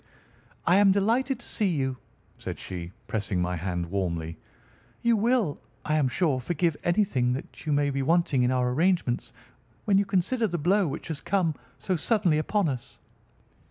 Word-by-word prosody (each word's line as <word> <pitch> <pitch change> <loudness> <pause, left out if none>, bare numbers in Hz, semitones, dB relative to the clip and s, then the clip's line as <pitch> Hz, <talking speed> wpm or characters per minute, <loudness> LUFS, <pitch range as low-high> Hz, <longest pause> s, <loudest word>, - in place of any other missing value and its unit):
"I 175 +2 +5
am 200 -1 +6
delighted 230 +6 +1
to - - -12
see 210 - 0
you," 135 -7 -1 0.4
said - - -5
she, 90 -2 -6
pressing 105 -4 -1
my 90 0 0
hand 90 0 -2
warmly. 85 -4 -2 0.6
"You 235 -1 +4
will, 225 - +1 0.3
I 150 - 0
am 150 -3 +3
sure, 145 0 +1
forgive 170 +4 0
anything 170 -10 +2
that 135 +4 -8
may 145 -1 +2
be 135 0 -1
wanting 160 -2 +2
in 125 - +3
our 125 -1 +1
arrangements, 165 -3 +1 0.5
when 195 -2 +4
you 200 - +1
consider 200 +5 +1
the 175 -3 -2
blow 185 +4 +2
which 140 - -5
has 155 -2 -4
come 180 -5 +1 0.2
so 185 -2 -1
suddenly 185 -5 +2
upon 200 +4 +1
us." 130 -4 -5
155 Hz, 165 wpm, -27 LUFS, 125-195 Hz, 0.6 s, am